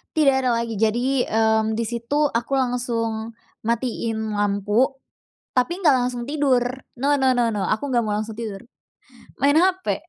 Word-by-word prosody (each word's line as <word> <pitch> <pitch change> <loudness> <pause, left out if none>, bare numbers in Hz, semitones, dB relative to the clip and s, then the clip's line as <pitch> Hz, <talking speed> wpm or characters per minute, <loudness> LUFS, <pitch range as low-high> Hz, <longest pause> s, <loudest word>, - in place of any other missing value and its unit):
Tidak 305 -3 +5 0.2
ada - - +3
lagi. 230 -3 -4
Jadi, 245 +4 +1
mmm, 220 0 +2
di 230 - -1
situ 240 +6 0
aku 235 +4 -3
langsung 230 -3 -1 0.3
matiin 230 -2 -1
lampu, 205 +4 +2 0.7
tapi 345 +10 +1
nggak 300 -7 +5
langsung 245 -1 -3
tidur. 285 -4 +2 0.4
No 285 +1 +3
no 265 -1 +3
no 240 -2 +2
no, 210 -3 -2
aku 275 +7 -1
nggak 240 -2 +2
mau 210 - -1
langsung 215 +1 -4
tidur, 215 -4 -5 0.8
main 285 +2 +4
hape. 370 -3 +1
235 Hz, 155 wpm, -22 LUFS, 220-270 Hz, 0.8 s, Tidak